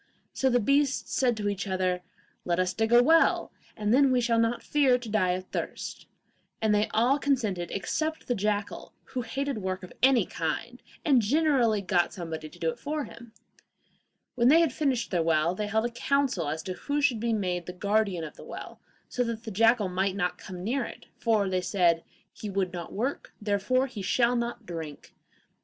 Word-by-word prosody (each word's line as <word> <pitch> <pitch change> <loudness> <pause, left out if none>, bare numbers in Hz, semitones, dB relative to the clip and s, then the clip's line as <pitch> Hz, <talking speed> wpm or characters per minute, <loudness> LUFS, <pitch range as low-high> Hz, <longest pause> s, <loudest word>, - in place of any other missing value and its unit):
So 265 - +1
the 245 -1 +3
beasts 275 +3 +1
said 245 -3 +2
to 205 -1 -2
each 200 0 -2
other, 185 -1 0 0.4
'Let 175 -1 0
us 185 0 +1
dig 225 +1 0
a 240 0 +7
well, 325 +4 +4 0.3
and 210 +1 +1
then 270 +1 +5
we 250 - +3
shall 230 -1 +2
not 230 +1 +1
fear 275 -4 +3
to 245 -2 -8
die 185 -4 +2
of 185 +1 -4
thirst;' - - -5 0.5
and 220 -1 +2
they 210 +1 +2
all 245 +6 +2
consented 220 -12 0
except 315 +10 -2
the 245 - +1
jackal, 210 -1 -2
who 255 - -4
hated 270 +1 -3
work 185 -1 -3
of 180 - -10
any 260 -1 +5
kind, - - -4 0.2
and 270 -5 +5
generally 245 -4 +2
got 175 -3 +1
somebody 160 -4 -6
to - - -16
do 165 -1 0
it - - -12
for 300 +1 -2
him. 235 -3 -12 1.0
When 240 -1 +2
they 320 +5 +7
had 320 -7 +2
finished 270 -6 0
their 175 -3 +2
well, 165 +1 +2
they 210 +2 -3
held 220 +2 +1
a 240 - -2
council 260 - 0
as 160 +1 -3
to 185 - -4
who 285 +9 -2
should 275 -6 +2
be 235 +1 0
made 180 -5 -1
the - - -4
guardian 200 -1 0
of 155 - -8
the - - -11
well, - - -9 0.3
so 250 - -1
that 230 -1 -4
the 220 - -6
jackal 225 +1 +4
might 190 +1 -1
not 180 -2 -1
come 180 -1 -8
near 245 +6 0
it, - - -9
for, 220 -4 +2
they 185 -1 0
said, 175 -3 +2 0.3
'he 210 - -7
would 190 -2 -1
not 175 -1 -6
work, 250 +7 -3
therefore 210 +5 +1
he 245 -6 -7
shall 235 +5 +2
not 235 -1 -3
drink. 160 -5 -7
220 Hz, 200 wpm, -28 LUFS, 185-250 Hz, 1.0 s, a